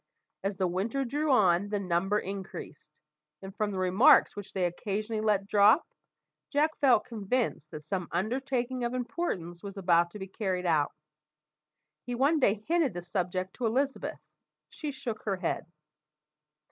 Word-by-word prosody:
As 195 Hz, 0 st, -2 dB
the 190 Hz, -, +1 dB
winter 210 Hz, +10 st, -1 dB
drew 295 Hz, +5 st, -1 dB
on, 200 Hz, -5 st, +4 dB
the 205 Hz, -1 st, -1 dB
number 190 Hz, +2 st, +1 dB
increased; 195 Hz, -1 st, -7 dB, 0.4 s
and 190 Hz, +1 st, -8 dB
from 210 Hz, -1 st, 0 dB
the 195 Hz, -, -4 dB
remarks 185 Hz, +10 st, +5 dB
which 205 Hz, -1 st, -7 dB
they 185 Hz, -2 st, 0 dB
occasionally 210 Hz, +5 st, -2 dB
let 210 Hz, -2 st, +2 dB
drop, 210 Hz, +8 st, +5 dB, 0.6 s
Jack 305 Hz, +2 st, +1 dB
felt 265 Hz, -4 st, +4 dB
convinced 220 Hz, -, -2 dB
that 155 Hz, -1 st, -8 dB
some 180 Hz, +2 st, -3 dB
undertaking 250 Hz, +6 st, -1 dB
of 240 Hz, +1 st, -1 dB
importance 210 Hz, -, -3 dB
was 200 Hz, 0 st, -8 dB
about 175 Hz, -2 st, +3 dB
to 190 Hz, -, -9 dB
be 190 Hz, -, -6 dB
carried 190 Hz, -2 st, -3 dB
out. 155 Hz, -4 st, +2 dB, 1.1 s
He 245 Hz, -1 st, -4 dB
one 285 Hz, +6 st, +3 dB
day 210 Hz, -5 st, +2 dB
hinted 320 Hz, -, +2 dB
the 175 Hz, -, -5 dB
subject 185 Hz, 0 st, -2 dB
to 245 Hz, -, 0 dB
Elizabeth. 270 Hz, +5 st, -1 dB, 0.5 s
She 305 Hz, -, -5 dB
shook 245 Hz, -5 st, -5 dB
her 200 Hz, -3 st, -1 dB
head. 175 Hz, -2 st, -3 dB
205 Hz, 155 wpm, -29 LUFS, 185-250 Hz, 1.1 s, remarks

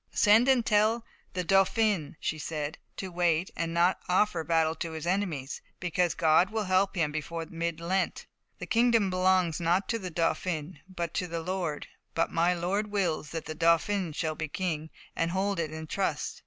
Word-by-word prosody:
"Send 220 Hz, +4 st, +5 dB
and 260 Hz, -4 st, +4 dB
tell 220 Hz, +2 st, +2 dB, 0.3 s
the 180 Hz, -, -1 dB
Dauphin," 195 Hz, -2 st, +2 dB
she 155 Hz, -, -2 dB
said, 150 Hz, 0 st, -4 dB, 0.2 s
"to 190 Hz, -1 st, -5 dB
wait 175 Hz, 0 st, +1 dB
and 165 Hz, 0 st, -2 dB
not 170 Hz, +2 st, +2 dB
offer 180 Hz, -2 st, +2 dB
battle 160 Hz, -1 st, +2 dB
to 165 Hz, -1 st, -4 dB
his 160 Hz, 0 st, -5 dB
enemies, 175 Hz, -8 st, -2 dB, 0.2 s
because 175 Hz, -1 st, 0 dB
God 165 Hz, +3 st, +4 dB
will 220 Hz, 0 st, -1 dB
give 190 Hz, -, -7 dB, 0.3 s
him 175 Hz, -, 0 dB
help 150 Hz, -, -1 dB
before 165 Hz, +2 st, -4 dB
mid 170 Hz, -1 st, -3 dB
Lent. 185 Hz, +3 st, -1 dB, 0.3 s
The -, -, -6 dB
kingdom 230 Hz, -4 st, +3 dB
belongs 185 Hz, -2 st, +2 dB
not 175 Hz, +3 st, +1 dB
to 230 Hz, -, 0 dB
the 185 Hz, -3 st, -5 dB
Dauphin, 165 Hz, -1 st, -2 dB
but 170 Hz, -3 st, -4 dB
to 180 Hz, -, -1 dB
my 170 Hz, -, -3 dB
Lord; 170 Hz, -3 st, -3 dB, 0.3 s
but 165 Hz, -, +1 dB
my 170 Hz, +2 st, +3 dB
Lord 190 Hz, +5 st, -1 dB
wills 180 Hz, -7 st, -1 dB
that 165 Hz, -1 st, -5 dB
the 155 Hz, -, -4 dB
Dauphin 170 Hz, +3 st, +2 dB
shall 155 Hz, +1 st, -2 dB
be 160 Hz, 0 st, -4 dB
king, 160 Hz, -1 st, -3 dB, 0.3 s
and 165 Hz, -, 0 dB
hold 190 Hz, +1 st, -1 dB
it 160 Hz, -2 st, -1 dB
in 160 Hz, 0 st, -6 dB
trust. 155 Hz, -3 st, -2 dB
175 Hz, 185 wpm, -29 LUFS, 160-190 Hz, 0.3 s, Send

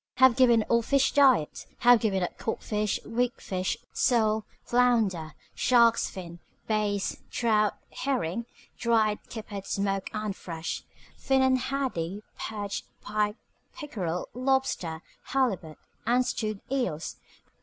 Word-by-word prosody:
Have 260 Hz, -2 st, +6 dB
given 240 Hz, -4 st, +5 dB
up -, -, -8 dB
all 235 Hz, 0 st, +5 dB
fish 275 Hz, +3 st, +2 dB
diet. 260 Hz, -, +3 dB
Have 245 Hz, -1 st, +7 dB
given 195 Hz, -5 st, +1 dB
up 175 Hz, -, -3 dB
codfish, 210 Hz, -2 st, -1 dB
weak 245 Hz, +2 st, -1 dB
fish, 185 Hz, -1 st, -2 dB, 0.2 s
sole, 220 Hz, -3 st, +2 dB, 0.2 s
flounder, 225 Hz, -10 st, +2 dB, 0.2 s
shark's 235 Hz, -2 st, +4 dB
fins, 175 Hz, -2 st, -8 dB, 0.3 s
bass, 210 Hz, -2 st, 0 dB
trout, 215 Hz, -3 st, +2 dB, 0.2 s
herring 235 Hz, -5 st, -2 dB, 0.3 s
(dried, 220 Hz, -3 st, +2 dB
kippered, 210 Hz, -4 st, -7 dB
smoked, 195 Hz, -1 st, -1 dB
and 215 Hz, -2 st, -3 dB
fresh), 165 Hz, -2 st, -5 dB, 0.3 s
finnan 265 Hz, -1 st, +3 dB
haddie, 215 Hz, -9 st, -2 dB
perch, 205 Hz, -2 st, -4 dB, 0.2 s
pike, 210 Hz, 0 st, 0 dB, 0.4 s
pickerel, 180 Hz, -, -3 dB
lobster, 250 Hz, -11 st, 0 dB, 0.2 s
halibut, 200 Hz, -, -1 dB, 0.3 s
and 250 Hz, +2 st, +3 dB
stewed 215 Hz, -4 st, -2 dB
eels. 185 Hz, -, -2 dB
215 Hz, 115 wpm, -28 LUFS, 195-245 Hz, 0.4 s, Have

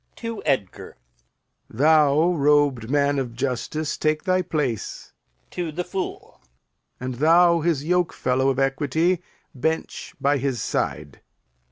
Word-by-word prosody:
[To 230 Hz, -2 st, -6 dB
Edgar] 105 Hz, -9 st, -2 dB, 0.7 s
Thou, 155 Hz, +5 st, +4 dB
robed 145 Hz, -6 st, +2 dB
man 145 Hz, 0 st, +2 dB
of 120 Hz, -3 st, -4 dB
justice, 140 Hz, +4 st, -3 dB
take 155 Hz, 0 st, 0 dB
thy 185 Hz, -1 st, +2 dB
place. 150 Hz, -, -3 dB, 0.4 s
[To 175 Hz, -3 st, -4 dB
the 175 Hz, +4 st, -3 dB
Fool] 185 Hz, +1 st, -6 dB, 0.6 s
And 130 Hz, +1 st, -4 dB
thou, 170 Hz, +2 st, +5 dB
his 160 Hz, -3 st, 0 dB
yokefellow 155 Hz, -7 st, +1 dB
of 135 Hz, -, -1 dB
equity, 145 Hz, +6 st, +1 dB, 0.3 s
Bench 160 Hz, +4 st, -3 dB
by 140 Hz, 0 st, +2 dB
his 130 Hz, -2 st, -2 dB
side. -, -, -3 dB
145 Hz, 120 wpm, -23 LUFS, 135-170 Hz, 0.7 s, thou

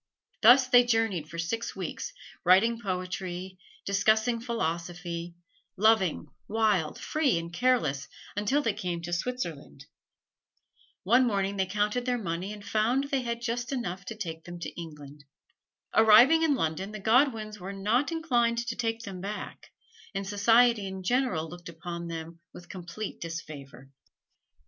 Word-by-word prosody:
Thus 255 Hz, +4 st, +7 dB
they 245 Hz, -1 st, +7 dB
journeyed 225 Hz, -9 st, 0 dB
for 170 Hz, -, -8 dB
six 225 Hz, +8 st, -3 dB
weeks, -, -, -5 dB, 0.3 s
writing 210 Hz, +6 st, +4 dB
poetry, 185 Hz, -1 st, -4 dB, 0.3 s
discussing 220 Hz, +4 st, +2 dB
philosophy; 170 Hz, -5 st, -4 dB, 0.4 s
loving, 200 Hz, -6 st, +3 dB, 0.2 s
wild, 210 Hz, -7 st, +1 dB
free 290 Hz, -, +1 dB
and 170 Hz, +1 st, -5 dB
careless, 175 Hz, -, +1 dB, 0.3 s
until 235 Hz, +9 st, +1 dB
they 225 Hz, -, +1 dB
came 180 Hz, -4 st, -4 dB
to 175 Hz, +1 st, -4 dB
Switzerland. 170 Hz, -, -4 dB, 1.2 s
One 245 Hz, +6 st, +4 dB
morning 200 Hz, -2 st, 0 dB
they 190 Hz, -1 st, +1 dB
counted 210 Hz, +5 st, -1 dB
their 250 Hz, -1 st, +1 dB
money 185 Hz, -2 st, -3 dB
and 210 Hz, -1 st, -9 dB
found 235 Hz, +7 st, +1 dB
they 270 Hz, -2 st, +1 dB
had 235 Hz, -1 st, -3 dB
just 240 Hz, +1 st, -2 dB
enough 195 Hz, -8 st, -3 dB
to 225 Hz, -, -6 dB
take 165 Hz, -7 st, -6 dB
them 175 Hz, 0 st, -8 dB
to -, -, -3 dB
England. 150 Hz, -3 st, -10 dB, 0.7 s
Arriving 225 Hz, +9 st, +7 dB
in 315 Hz, -3 st, +3 dB
London 190 Hz, 0 st, -2 dB
the 215 Hz, -, -6 dB
Godwins 220 Hz, -1 st, +2 dB
were 185 Hz, +2 st, -6 dB
not 215 Hz, +10 st, 0 dB
inclined 240 Hz, -8 st, +1 dB
to 230 Hz, 0 st, -3 dB
take 225 Hz, -1 st, -2 dB
them 190 Hz, -4 st, -7 dB
back, 205 Hz, +2 st, -7 dB, 0.4 s
and 195 Hz, 0 st, -2 dB
society 225 Hz, +1 st, +4 dB
in 190 Hz, 0 st, -6 dB
general 220 Hz, -8 st, +1 dB
looked 175 Hz, +1 st, -10 dB
upon 170 Hz, +1 st, -6 dB
them 165 Hz, 0 st, -7 dB, 0.2 s
with 175 Hz, -, -12 dB
complete 185 Hz, +3 st, -7 dB
disfavor. 145 Hz, -5 st, -8 dB
200 Hz, 145 wpm, -28 LUFS, 175-235 Hz, 1.2 s, Thus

